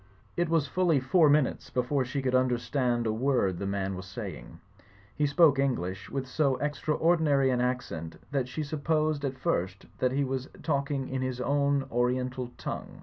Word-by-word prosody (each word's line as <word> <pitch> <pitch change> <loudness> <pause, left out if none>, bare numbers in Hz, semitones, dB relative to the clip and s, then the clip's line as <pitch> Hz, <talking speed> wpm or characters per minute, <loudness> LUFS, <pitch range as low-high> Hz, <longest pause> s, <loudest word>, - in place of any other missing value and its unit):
It 175 -1 0
was 165 -3 +2
fully 175 -2 +2
four 150 +5 +4
minutes 145 -2 +2
before 130 +2 0
she 135 +2 -3
could 130 -1 0
under 130 -1 +3
stand 120 -1 0
a 110 - +1
word 110 -7 +1
the 100 - -3
man 95 -1 -2
was 95 0 -7
saying; 95 -4 -8 0.6
he 150 - +2
spoke 145 -1 +5
English 100 -8 -1
with 135 -1 -3
so 135 +1 +1
extraordinary 150 0 +2
an 125 -1 +1
accent 85 -11 -3
that 135 -3 0
she 155 +5 -4
supposed 155 0 0
at 135 -1 -2
first 95 -5 -2
that 125 - +2
he 140 +1 +1
was 135 0 -3
talking 140 -3 -1
in 130 0 -3
his 130 -1 -2
own 140 +1 +1
oriental 125 +1 0
tongue. - - -6
130 Hz, 175 wpm, -29 LUFS, 120-145 Hz, 0.6 s, spoke